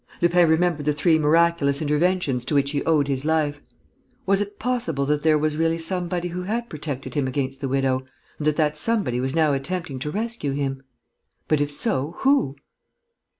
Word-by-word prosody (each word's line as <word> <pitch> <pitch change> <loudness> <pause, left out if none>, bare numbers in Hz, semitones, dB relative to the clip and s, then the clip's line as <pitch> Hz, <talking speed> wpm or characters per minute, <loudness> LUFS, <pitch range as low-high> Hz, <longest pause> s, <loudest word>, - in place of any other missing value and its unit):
Lupin 175 -1 +4
remembered 160 -2 +1
the 150 - +3
three 160 +2 +2
miraculous 155 -2 +3
interventions 150 -3 0
to 145 - -1
which 140 0 +2
he 145 -1 -1
owed 150 -4 +2
his 135 -1 -1
life. 150 -2 0 0.6
Was 195 +1 +3
it 205 0 -5
possible 220 - -1
that 150 +1 0
there 155 0 +4
was 150 0 0
really 165 0 +1
somebody 175 +1 0
who 180 +1 -4
had 230 +6 -3
protected 145 -3 -5
him 145 -3 0
against 135 0 -3
the 135 - -2
widow, 130 -1 0 0.3
and 150 - -2
that 155 - +2
that 150 -1 +1
somebody 200 - +1
was 130 +3 -2
now 155 -3 +3
attempting 140 0 -3
to 150 - -3
rescue 215 -6 -3
him? 135 -1 -2 0.7
But, 155 -2 +2
if 145 0 -1
so, 155 - -1
who? 270 - +2
155 Hz, 185 wpm, -23 LUFS, 140-175 Hz, 0.7 s, Lupin